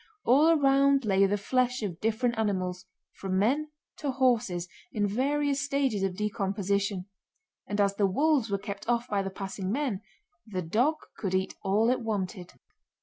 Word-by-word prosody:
All 280 +6 +5
around 275 -3 +4
lay 195 -1 +4
the 205 +1 0
flesh 250 +3 0
of 180 -5 -4
different 230 +2 +1
animals—from 185 -1 -3
men 275 +10 +1 0.3
to 290 - -3
horses—in 220 -6 0
various 280 +6 0
stages 275 -6 0
of 190 -2 -1
decomposition; 200 -2 -1 0.6
and 205 0 -3
as 200 -1 +3
the 200 - +3
wolves 280 +3 +2
were 200 - 0
kept 200 +2 -7
off 240 0 +1
by 205 -3 0
the 195 - -3
passing 190 0 -5
men 245 -6 -1 0.4
the 185 -4 -4
dog 240 - +2 0.2
could 190 -3 -1
eat 190 0 0
all 205 +3 +2
it 255 - 0
wanted. 190 -5 -3
210 Hz, 150 wpm, -28 LUFS, 195-255 Hz, 0.6 s, All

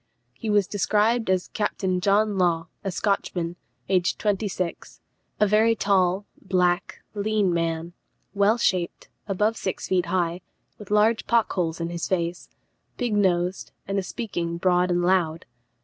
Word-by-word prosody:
He 220 - -6
was 205 -2 +3
described 215 +3 +1
as 185 -1 +1
"Captain 190 -3 -1
John 205 +2 +2
Law, 175 -2 +1
a 195 - -1
Scotchman, 180 -3 -1 0.3
aged 185 -1 +1
twenty 210 0 0
six; 180 -3 -5 0.4
a 210 - +5
very 215 +3 +4
tall, 195 -1 +2 0.2
black, 180 -1 0
lean 205 -3 +1
man; 165 0 -2 0.4
well 205 +3 +3
shaped, 180 -6 -1 0.2
above 210 +3 +1
six 190 - -3
feet 180 -1 +1
high, 175 0 0 0.4
with 210 - -11
large 210 +2 +3
pock 235 -2 +2
holes 170 -3 -1
in 170 0 -3
his 170 -1 -3
face; 175 -1 -2 0.5
big 245 -4 -1
nosed, 185 -2 +1
and 195 0 -1
speaking 175 -5 -4
broad 180 0 +2
and 175 0 +1
loud." 175 -3 +1
190 Hz, 145 wpm, -25 LUFS, 175-210 Hz, 0.5 s, a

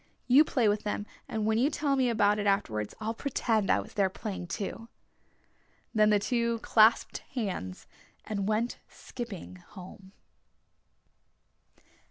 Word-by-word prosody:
You 265 +4 +7
play 250 -7 +1
with 205 0 +1
them 210 -1 -3 0.2
and 220 -1 -2
when 220 +1 +2
you 265 +4 +3
tell 290 -2 0
me 260 -2 +2
about 210 -2 +2
it 205 - -1
afterwards 110 - 0
I'll 220 +1 -2
pretend 225 -5 0
I - - +4
was 100 - -8
there 195 -2 +2
playing 190 -2 -6
too." 215 +6 -5 1.0
Then 215 -2 +4
the 210 - +5
two 235 +2 0
clasped 220 +1 +4 0.2
hands 185 - -4 0.4
and 200 -2 -2
went 220 +3 -1
skipping 210 -7 -8
home. 185 +1 -13
215 Hz, 140 wpm, -29 LUFS, 195-235 Hz, 1.0 s, You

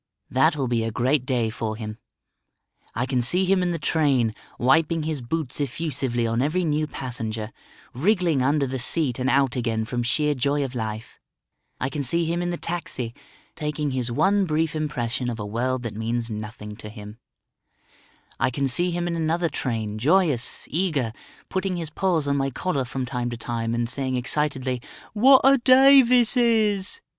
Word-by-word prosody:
That 150 +5 +3
will 135 -3 -1
be 120 -2 0
a 115 - -1
great 125 +4 0
day 120 -4 0
for 110 -1 -3
him. 110 0 -7 1.0
I 125 - 0
can 130 -1 0
see 180 +10 +1
him 190 0 +3
in 180 - 0
the 170 - -1
train, 140 -7 +1 0.2
wiping 160 +5 +2
his 155 -3 -3
boots 145 +2 -3
effusively 135 -3 -1
on 115 +1 0
every 155 +7 0
new 155 -1 0
passenger, 115 -5 -5 0.4
wriggling 170 - +2
under 140 +2 +2
the 130 0 -3
seat 130 -1 +2
and 130 +1 0
out 135 -2 +2
again 115 -3 -1
from 120 +2 -2
sheer 150 +5 +2
joy 140 +2 0
of 130 - -7
life; 110 -2 -5 0.6
I 130 - -1
can 145 +2 -3
see 165 +6 0
him 170 +2 -1
in 175 - -1
the 175 - -2
taxi, 150 -10 -3 0.4
taking 150 -2 -2
his 125 -2 -2
one 195 +10 +2
brief 160 -1 0
impression 125 -5 -2
of 115 -1 -5
a 105 - -4
world 125 +4 -2
that 115 - -4
means 115 +2 -2
nothing 105 0 -7
to 105 - -9
him; 105 0 -11 1.2
I 130 - +2
can 135 +2 -1
see 175 +8 +2
him 175 0 -2
in 170 - -2
another 165 +1 0
train 110 -7 -3
joyous, 150 - +2
eager, 150 -9 0 0.3
putting 190 -1 -2
his 165 -3 -5
paws 165 -4 0
on 140 0 +1
my 135 0 0
collar 140 0 -2
from 130 +1 -4
time 125 -1 -3
to 120 - -5
time 115 0 -3
and 120 0 -1
saying 130 +1 -2
excitedly, 130 -1 -1 0.3
"What 260 +5 +6
a 270 +1 +6
day 270 +2 +7
this 245 0 +4
is!" 220 - +2
135 Hz, 180 wpm, -24 LUFS, 120-165 Hz, 1.2 s, day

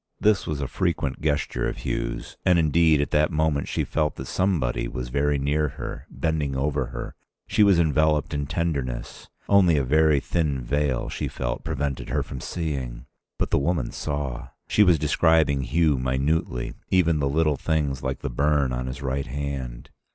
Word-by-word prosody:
This 105 -2 +2
was 75 -2 -2
a 70 - -1
frequent 75 -6 -1
gesture 75 -1 0
of - - -8
Hugh's. - - -3
And 90 -1 +4
indeed 80 -1 +4
at 70 - -2
that 75 0 +3
moment 80 -2 +1
she - - -1
felt 75 -2 -1
that 65 - -6
somebody 85 -7 0
was 60 -1 -5
very 70 +2 +1
near 75 +2 +1
her, 75 +2 -7
bending 75 0 -1
over 70 -1 0
her. - - -6 0.3
She 110 - +1
was 100 -3 +6
enveloped 80 -2 +2
in 70 -1 -2
tenderness. 70 -6 -3 0.2
Only 90 -6 +5
a 70 - +2
very 75 +2 +4
thin 75 -5 -1
veil, 70 0 0
she - - -3
felt, - - -4
prevented 70 -3 -3
her - - 0
from 65 - -7
seeing. 65 -8 -4 0.3
But - - -1
the - - +4
woman 75 -3 0
saw. 70 -3 -4 0.2
She - - +2
was 90 -5 +6
describing 80 -3 +3
Hugh 75 -2 +2
minutely, 65 0 -1 0.2
even 85 -4 +3
the 70 -1 +1
little 75 0 +2
things 75 -4 -1
like - - -3
the - - -3
burn 70 0 +1
on 65 +1 -3
his 70 +2 -6
right 70 +1 -2
hand. 65 -3 -5
75 Hz, 175 wpm, -25 LUFS, 65-80 Hz, 0.3 s, was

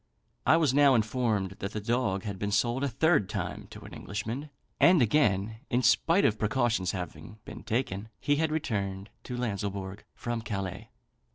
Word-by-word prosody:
I 160 - +6
was 155 -6 +2
now 140 -1 +6
informed 110 -4 0
that 100 +2 -4
the 110 - -2
dog 105 -3 0
had 100 -3 -5
been 100 - -1
sold 120 +6 +1
a - - +2
third 145 - +2
time - - -4
to - - -11
an - - -11
Englishman; 115 +8 -5 0.3
and 175 -1 +6
again, 110 -5 +2
in 125 +1 +1
spite 165 - +4
of 105 -1 +2
precautions 110 -4 +1
having 90 +1 -7
been - - -9
taken, 110 -2 -2
he 145 0 +1
had 160 0 +1
returned 100 -9 -3
to 125 - -5
Lanslebourg 100 -4 -3
from 120 -1 -3
Calais." 95 -5 -5
110 Hz, 170 wpm, -29 LUFS, 100-130 Hz, 0.3 s, I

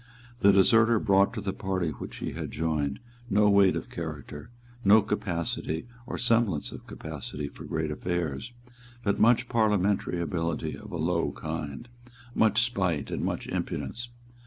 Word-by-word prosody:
The 100 - +6
deserter 110 +4 +5
brought 100 -1 +4
to 110 - -3
the 95 -1 -2
party 95 -5 -1
which 70 - -8
he - - -4
had - - -5
joined 75 -3 -1 0.3
no 105 +1 +4
weight 100 -2 +5
of - - -5
character, 75 +3 -6 0.3
no 105 +1 +7
capacity 85 -5 -2 0.2
or - - -4
semblance 115 -10 +1
of - - -10
capacity 75 0 -6
for - - -11
great 80 -1 -2
affairs, 85 - -2 0.5
but 100 -3 +1
much 120 +2 +5
parliamentary 105 -6 +1
ability 85 -1 -2
of 105 - -11
a 85 - -3
low 85 -2 0
kind, 80 - -5 0.5
much 110 0 +4
spite 95 - -1
and - - -2
much - - -2
impudence. 110 - -4
95 Hz, 150 wpm, -28 LUFS, 80-105 Hz, 0.5 s, no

